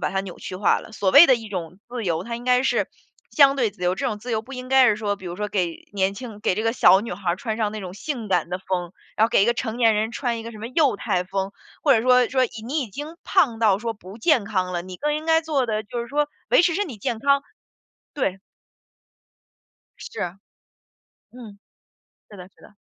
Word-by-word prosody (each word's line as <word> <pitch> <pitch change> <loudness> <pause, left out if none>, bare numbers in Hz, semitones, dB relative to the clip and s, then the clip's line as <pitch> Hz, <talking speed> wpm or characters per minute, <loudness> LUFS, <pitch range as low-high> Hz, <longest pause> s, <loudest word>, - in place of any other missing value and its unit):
把 - - -1
它 195 - 0
扭 190 -3 -9
曲 185 - -7
化 200 - +3
了， 220 - -13
所 195 -3 0
谓 340 - +9
的 260 - +6
一 225 -2 -6
种 180 -1 -6
自 240 -2 -5
由， 170 -2 -1
它 235 0 -4
应 240 - -10
该 250 0 +3
是 265 - +1 0.4
相 280 -2 +5
对 240 -5 +1
自 190 -2 -15
由， 180 +1 +2
这 275 - -3
种 215 -3 -2
自 240 +4 -7
由 220 - 0
不 250 +5 -13
应 255 0 -7
该 265 -1 +6
是 210 -3 +3
说 205 -2 -2
比 190 - -11
如 175 - -5
说 210 0 -3
给 180 -4 -3
年 195 0 0
轻 225 -3 -9
给 200 - +1
这 215 - -2
个 225 0 +1
小 190 -5 +6
女 230 - -5
孩 180 -2 -1
穿 220 +2 -4
上 215 -2 -1
那 215 - -5
种 185 -2 -7
性 230 +1 -5
感 180 -2 +1
的 180 +1 -3
风， 180 -2 -3 0.2
然 220 - +4
后 - - -8
给 - - +4
一 - - +3
个 235 - +4
成 235 -2 -4
年 230 -3 +4
人 220 +2 -1
穿 240 -2 -2
一 - - -6
个 230 +1 -8
什 215 - -11
么 225 - -6
幼 265 -3 +2
态 180 -2 -1
风， 195 +1 -3 0.3
或 290 - +5
者 225 -3 +3
说 250 -1 +4
说 260 -1 +2
你 225 -2 -7
你 295 +4 -1
已 245 - -4
经 295 - -8
胖 275 - +2
到 210 -4 +3
说 230 +1 -3
不 195 +1 -12
健 255 - +2
康 185 -3 -1
了， 175 - -1
你 185 0 -9
更 295 +8 -1
应 310 +1 -4
该 325 0 +4
做 290 -6 0
的 215 -1 -1
就 235 +3 -5
是 235 - -5
说， 295 +2 0 0.2
维 - - +6
持 350 -1 +2
身 405 +2 0
体 255 - -8
健 220 +3 -3
康， 280 +3 +2 0.7
对。 195 -9 -1 1.6
是。 480 -2 -8 1.1
嗯， 225 -5 -12 0.7
是 205 - -12
的 180 -1 -10
是 - - -27
的。 205 - -17
220 Hz, 270 characters per minute, -23 LUFS, 195-255 Hz, 1.6 s, 谓